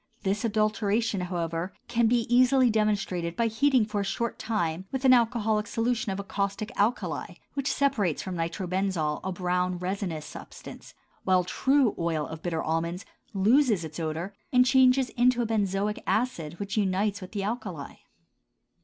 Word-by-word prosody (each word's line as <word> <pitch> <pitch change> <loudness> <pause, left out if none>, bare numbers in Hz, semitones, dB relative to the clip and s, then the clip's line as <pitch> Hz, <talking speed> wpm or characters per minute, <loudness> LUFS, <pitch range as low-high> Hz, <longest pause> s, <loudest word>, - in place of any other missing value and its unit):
This 200 +3 0
adulteration, 215 -1 +1
however, 170 0 -3
can 235 -1 +2
be 240 +1 +3
easily 250 +2 +4
demonstrated 195 -6 0
by 235 - +1
heating 250 +1 +3
for 210 -1 -2
a - - -1
short 225 +4 -3
time 185 -5 -2
with 265 0 -3
an 260 - +8
alcoholic 225 -3 +2
solution 230 -1 -1
of 190 - -4
a - - -3
caustic 200 +3 -3
alkali 220 +5 -1 0.2
which 275 -1 -1
separates 230 - 0
from 185 -1 -5
nitrobenzol 175 -2 -1
a 190 - -2
brown 180 0 -1
resinous 180 -3 -3
substance, - - -11 0.3
while 185 -1 +3
true 265 +6 +2
oil 165 -3 0
of 160 +1 -8
bitter 165 -2 -2
almonds 170 +5 -2 0.3
loses 215 - +3
its 155 +1 -8
odor 165 +4 -3 0.2
and 250 -1 +5
changes 260 -1 +4
into 245 0 +2
benzoic 205 -1 -1
acid 175 -10 -1
which 200 +1 -4
unites 200 0 0
with 185 - -9
the 200 -2 -2
alkali. 195 - -5
200 Hz, 155 wpm, -27 LUFS, 180-235 Hz, 0.3 s, an